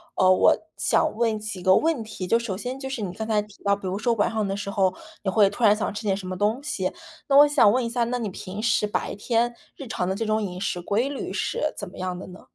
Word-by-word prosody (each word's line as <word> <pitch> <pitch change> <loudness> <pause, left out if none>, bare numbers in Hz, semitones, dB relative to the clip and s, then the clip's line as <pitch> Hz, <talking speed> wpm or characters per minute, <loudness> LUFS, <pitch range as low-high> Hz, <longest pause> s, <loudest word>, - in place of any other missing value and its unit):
呃， 185 0 +5
我 185 - +5 0.2
想 - - +1
问 225 -2 +1
几 210 -3 -6
个 185 +1 +5
问 315 -8 +1
题。 210 -4 -6
就 230 - +4
首 230 -5 -3
先 255 +4 -5
就 265 -1 -5
是 260 -5 -4
你 185 -3 -3
刚 220 +2 -5
才 215 -2 +2
提 210 -1 -15
到， 200 0 +3
比 195 -2 -7
如 185 - -2
说 235 0 +2
晚 205 - +1
上 215 -2 -1
的 195 - -2
时 200 - -4
候 190 -2 +2 0.3
你 190 - 0
会 200 0 +4
突 220 +4 -6
然 210 -1 +7
想 215 - -2
吃 215 - -6
点 195 -2 +1
什 195 -2 -7
么 185 0 -4
东 215 +6 +1
西。 300 - -2 0.4
那 275 0 +5
我 290 - +9
想 285 -8 +5
问 255 +2 +1
一 - - -2
下， 240 0 0
那 245 +1 -1
你 220 -4 -3
平 185 +2 -7
时 210 -2 +2
白 - - -2
天 235 +3 0 0.2
日 275 - -8
常 180 -4 -2
的 190 - -1
这 225 - -2
种 215 0 +1
饮 185 -3 -4
食 180 -2 -2
规 225 +9 0
律 285 - -5
是 305 - -1
怎 200 - -6
么 - - -14
样 180 -1 -3
的 185 - -8
呢？ 180 0 -12
210 Hz, 305 characters per minute, -25 LUFS, 190-235 Hz, 0.4 s, 我